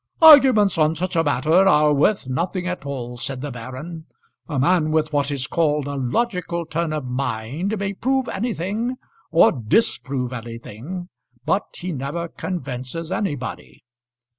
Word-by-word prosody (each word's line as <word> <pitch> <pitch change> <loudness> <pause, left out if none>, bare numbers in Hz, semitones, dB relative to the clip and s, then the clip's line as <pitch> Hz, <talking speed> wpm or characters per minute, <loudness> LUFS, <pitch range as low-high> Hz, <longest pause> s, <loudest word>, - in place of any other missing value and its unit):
"Arguments 260 - +8
on 155 +1 +3
such 185 +3 -3
a 165 - +3
matter 145 +1 +1
are 150 -4 +5
worth 150 +2 +2
nothing 175 +7 -2
at 180 -5 -4
all," 125 -3 -5
said 130 +1 -4
the 145 0 -4
baron. 130 +8 -8 0.4
"A 150 - -3
man 155 +3 +3
with 155 0 0
what 145 -1 +1
is 140 -2 -1
called 150 -2 +1
a 145 - -4
logical 170 - -1
turn 165 0 -2
of 155 -3 -3
mind 135 - -2
may 200 0 -2
prove 265 +5 0
anything 225 +3 -2 0.3
or 165 - +6
disprove 130 - 0
anything; 120 - -7 0.4
but 190 +6 +1
he 180 +1 -4
never 150 +4 -3
convinces 155 -1 -5
anybody. 165 - -4
155 Hz, 145 wpm, -22 LUFS, 135-185 Hz, 0.4 s, Arguments